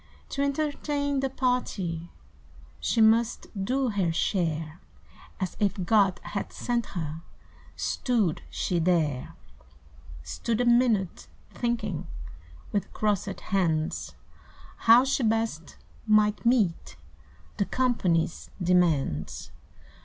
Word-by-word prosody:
To 275 - -2
entertain 285 0 -1
the 270 0 0
party 200 -11 -1 0.7
She 230 - +1
must 225 +1 +3 0.2
do 260 +3 +1
her 195 -6 0
share, 165 -2 -1 0.6
As 185 -3 -3
if 205 -2 +1
God 195 -3 +3
had 200 - -4
sent 240 -2 -2
her 160 -1 -4 0.5
Stood 220 - 0
she 175 - -1
there; 160 -6 0 0.9
Stood 85 - -2
a 245 - +2
minute, 235 -6 +2 0.2
thinking, 225 -7 -2 0.6
With 205 - -2
crossed 205 -2 -1
hands 165 -6 -1 0.7
How 235 +2 +9
she 270 0 0
best 220 -9 -1 0.3
might 215 +1 +3
meet 215 -9 +1 0.6
the 200 - +1
Company's 185 -11 0
demands. 170 - +1
205 Hz, 100 wpm, -27 LUFS, 170-240 Hz, 0.9 s, How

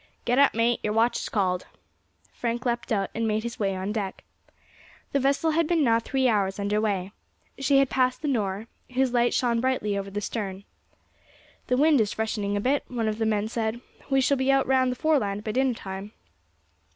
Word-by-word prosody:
"Get 245 +2 +2
up, 280 -4 +5
mate, 230 +1 +2
your 210 - -1
watch 230 +2 +2
is - - -5
called." 185 -3 0 0.7
Frank 240 +2 -3
leapt 240 -1 -2
out 200 -3 0
and 225 0 -1
made 215 0 0
his 235 +1 -6
way 195 -2 0
on 190 +2 -3
deck. 205 -3 -4 0.9
The 280 - +2
vessel 275 +4 +2
had 325 0 +1
been 330 -2 +2
now 230 -3 +4
three 265 +2 0
hours 200 -4 +1
under 205 +1 0
weigh. 195 -3 -1 0.5
She 275 0 +3
had 275 -1 +3
passed 255 +2 +1
the - - -1
Nore, 210 -5 -1 0.3
whose 260 -1 +2
light 240 0 +3
shone 235 -2 +1
brightly 255 -6 0
over 200 0 -3
the 205 +1 -3
stern. 200 -2 -4 1.0
"The 250 - +1
wind 295 -2 +5
is 210 - -1
freshening 210 -2 -2
a - - 0
bit," 265 +7 +1
one 235 -3 -2
of 215 0 -2
the 225 - +1
men 210 -1 0
said, 225 0 -2 0.3
"we 270 -1 +3
shall 280 +2 +2
be 265 +1 +2
out 270 0 +3
round 260 -1 +2
the - - -3
Foreland 245 -10 0
by 215 - -2
dinner 260 +1 +1
time." 195 +1 -7
230 Hz, 205 wpm, -26 LUFS, 205-260 Hz, 1.0 s, up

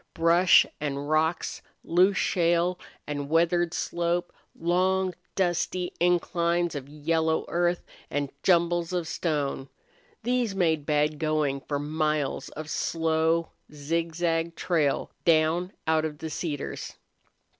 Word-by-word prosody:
Brush 170 +2 +5
and 145 0 -3
rocks, 160 +2 0 0.2
loose 185 +3 +3
shale 175 +1 +1 0.3
and 145 -1 -4
weathered 170 +1 +2
slope, 175 +1 -1 0.3
long, 185 +2 +1 0.2
dusty 180 0 0
inclines 175 -1 +1
of 140 -2 -6
yellow 160 +2 0
earth, 175 0 0 0.2
and 145 -1 -2
jumbles 170 -1 +2
of 175 -3 -1
stone 145 -5 -2 0.5
these 240 -3 0
made 160 -6 +1
bad 150 0 +1
going 155 -3 0
for 145 - -3
miles 150 -1 -1
of 155 0 -8
slow, 160 +1 0 0.2
zigzag 165 +2 -1
trail 155 -7 0
down 165 +2 +3
out 160 0 +2
of 155 -1 -3
the 160 +1 -6
cedars. 150 -3 -4
165 Hz, 115 wpm, -27 LUFS, 155-175 Hz, 0.5 s, Brush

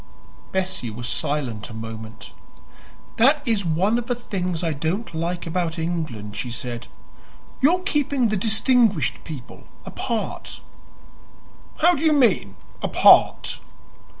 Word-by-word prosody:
Bessie 190 -9 -2
was 120 +3 -6
silent 125 -6 -2
a 110 - -9
moment. 110 0 -8 0.8
"That 280 +4 +4
is 220 -3 +2
one 185 +8 +1
of 235 - -7
the 245 - 0
things 180 -7 -3
I 165 -2 0
don't 160 +10 -3
like 170 +2 -3
about 170 -1 -2
England," 155 -11 -3
she 125 - -4
said; 120 0 -5 0.7
"your 350 +7 +4
keeping 285 - +1
the 215 - 0
distinguished 220 - +2
people 145 -6 -9 0.2
apart." - - -4 1.2
"How 350 +2 +7
do 300 - -3
you 315 -1 +4
mean 220 - +2 0.3
apart?" - - +5
175 Hz, 125 wpm, -23 LUFS, -, 1.2 s, How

